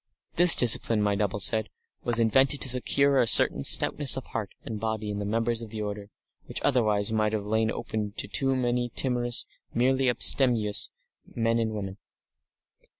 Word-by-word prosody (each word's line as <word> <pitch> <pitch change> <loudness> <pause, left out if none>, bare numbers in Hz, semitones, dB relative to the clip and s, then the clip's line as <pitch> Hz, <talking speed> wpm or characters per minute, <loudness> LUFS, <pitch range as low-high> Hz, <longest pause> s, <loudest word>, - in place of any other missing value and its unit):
This 175 0 +7
discipline, 115 -2 +3
my 105 -1 0
double 100 0 -3
said, 110 +1 0 0.3
was 120 -1 -1
invented 130 +5 +2
to 130 - +6
secure 135 +2 +1
a 120 - +1
certain 70 - +2
stoutness 140 - +5
of 130 - -7
heart 110 -4 -6 0.2
and 110 -2 -7
body 110 -1 -4
in 100 - -6
the 100 - -5
members 115 +2 -2
of 115 - -9
the 110 -1 -6
order, 105 -1 -7 0.4
which - - -4
otherwise 110 -6 +1
might 110 -1 -1
have 105 -2 -3
lain 110 +1 -1
open 110 -2 -5
to - - -4
too 135 +5 0
many 120 -1 -2
timorous, 120 -2 -1 0.3
merely 130 +2 +1
abstemious, 120 -4 +2 0.5
men 115 0 -1
and 110 -1 -3
women. 100 -2 -7
115 Hz, 170 wpm, -25 LUFS, 105-125 Hz, 0.5 s, This